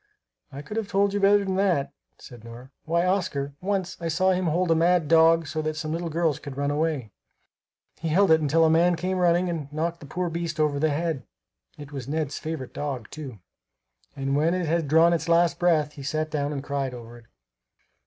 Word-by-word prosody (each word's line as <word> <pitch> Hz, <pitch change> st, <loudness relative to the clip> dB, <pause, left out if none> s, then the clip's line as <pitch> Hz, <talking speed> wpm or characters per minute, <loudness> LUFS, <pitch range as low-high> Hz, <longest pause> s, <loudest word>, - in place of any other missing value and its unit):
"I 140 Hz, +1 st, -8 dB
could 210 Hz, +9 st, -7 dB
have 220 Hz, -3 st, -2 dB
told 200 Hz, +1 st, +1 dB
you 205 Hz, -, 0 dB
better 200 Hz, 0 st, +4 dB
than 190 Hz, -1 st, -1 dB
that," 180 Hz, -8 st, +1 dB, 0.2 s
said 120 Hz, -3 st, -13 dB
Nora. 120 Hz, +3 st, -11 dB
"Why, 170 Hz, +2 st, +1 dB
Oscar, 170 Hz, -7 st, -1 dB
once 190 Hz, -1 st, -2 dB
I 170 Hz, -, -2 dB
saw 185 Hz, +4 st, +2 dB
him 185 Hz, -1 st, 0 dB
hold 170 Hz, +2 st, +1 dB
a -, -, +5 dB
mad 170 Hz, 0 st, +2 dB
dog 165 Hz, +1 st, +5 dB
so 155 Hz, +2 st, -3 dB
that 155 Hz, 0 st, -3 dB
some 155 Hz, 0 st, -4 dB
little 170 Hz, +1 st, -3 dB
girls 160 Hz, -3 st, 0 dB
could 140 Hz, -2 st, -9 dB
run 140 Hz, 0 st, 0 dB
away. 150 Hz, -7 st, -1 dB, 0.9 s
He 165 Hz, -, -3 dB
held 185 Hz, +4 st, +3 dB
it 160 Hz, 0 st, +5 dB
until 160 Hz, +2 st, +3 dB
a -, -, +4 dB
man 170 Hz, +2 st, +4 dB
came 185 Hz, +3 st, -2 dB
running 175 Hz, 0 st, +3 dB
up -, -, -2 dB
and 145 Hz, -3 st, -7 dB
knocked 165 Hz, +3 st, -2 dB
the 145 Hz, -, -11 dB
poor 175 Hz, +4 st, -3 dB
beast 170 Hz, -1 st, -4 dB
over 150 Hz, -2 st, +1 dB
the 155 Hz, +2 st, +2 dB
head. 155 Hz, -3 st, -2 dB, 0.5 s
It 145 Hz, -1 st, -10 dB
was 135 Hz, -3 st, -6 dB
Ned's 150 Hz, -1 st, -2 dB
favorite 155 Hz, -5 st, -6 dB
dog, 135 Hz, -6 st, -5 dB
too, 135 Hz, -, -8 dB, 0.7 s
and 135 Hz, 0 st, -2 dB
when 160 Hz, +4 st, +2 dB
it 180 Hz, -1 st, -1 dB
had 165 Hz, -1 st, 0 dB
drawn 165 Hz, +4 st, +5 dB
its 170 Hz, 0 st, -2 dB
last 170 Hz, -2 st, +3 dB
breath 160 Hz, -4 st, +2 dB
he 140 Hz, -, -10 dB
sat 155 Hz, +3 st, -2 dB
down 145 Hz, -2 st, -1 dB
and 140 Hz, -2 st, -4 dB
cried 140 Hz, -3 st, -3 dB
over 120 Hz, 0 st, -11 dB
it." 115 Hz, -, -21 dB
160 Hz, 220 wpm, -25 LUFS, 145-175 Hz, 0.9 s, a